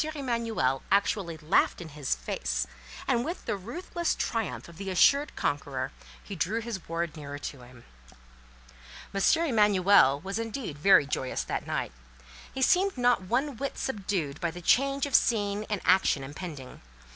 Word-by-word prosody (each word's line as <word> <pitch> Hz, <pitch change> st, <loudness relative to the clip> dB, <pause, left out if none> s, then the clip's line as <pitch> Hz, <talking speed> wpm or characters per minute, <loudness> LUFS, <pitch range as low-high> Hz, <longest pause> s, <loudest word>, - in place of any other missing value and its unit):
Emanuel 230 Hz, -, -1 dB
actually 195 Hz, -4 st, +1 dB
laughed 155 Hz, +4 st, +2 dB
in 170 Hz, -3 st, -8 dB
his 145 Hz, -, -2 dB
face, -, -, -2 dB, 0.4 s
and 235 Hz, -, +2 dB
with 335 Hz, +6 st, -5 dB
the -, -, -1 dB
ruthless 335 Hz, -, -3 dB
triumph 225 Hz, -4 st, -3 dB
of 170 Hz, -1 st, -14 dB
the 195 Hz, +1 st, -5 dB
assured 280 Hz, +10 st, +4 dB
conqueror, 135 Hz, -2 st, -2 dB, 0.3 s
he 200 Hz, -, -7 dB
drew 195 Hz, +7 st, 0 dB
his 225 Hz, -7 st, -6 dB
ward 165 Hz, -1 st, -2 dB
nearer 145 Hz, -2 st, -7 dB
to 145 Hz, -2 st, -7 dB
him. 125 Hz, -1 st, -15 dB, 1.3 s
M. 195 Hz, -, -1 dB, 0.2 s
Emanuel 200 Hz, -, +4 dB
was 195 Hz, +4 st, -4 dB
indeed 225 Hz, -, -5 dB
very 190 Hz, -2 st, +6 dB
joyous 130 Hz, -2 st, -2 dB
that -, -, -4 dB
night. -, -, -2 dB, 0.6 s
He 265 Hz, -, -2 dB
seemed 375 Hz, +4 st, +3 dB
not 245 Hz, -3 st, +3 dB
one 245 Hz, +7 st, -1 dB
whit 275 Hz, +2 st, -4 dB
subdued 195 Hz, -, -3 dB
by 170 Hz, -, 0 dB
the 175 Hz, +2 st, -8 dB
change 275 Hz, +9 st, +2 dB
of 285 Hz, -, -6 dB
scene 210 Hz, -2 st, +2 dB
and 210 Hz, -2 st, -1 dB
action 185 Hz, -7 st, +3 dB
impending. 145 Hz, -2 st, -8 dB
195 Hz, 155 wpm, -28 LUFS, 150-235 Hz, 1.3 s, very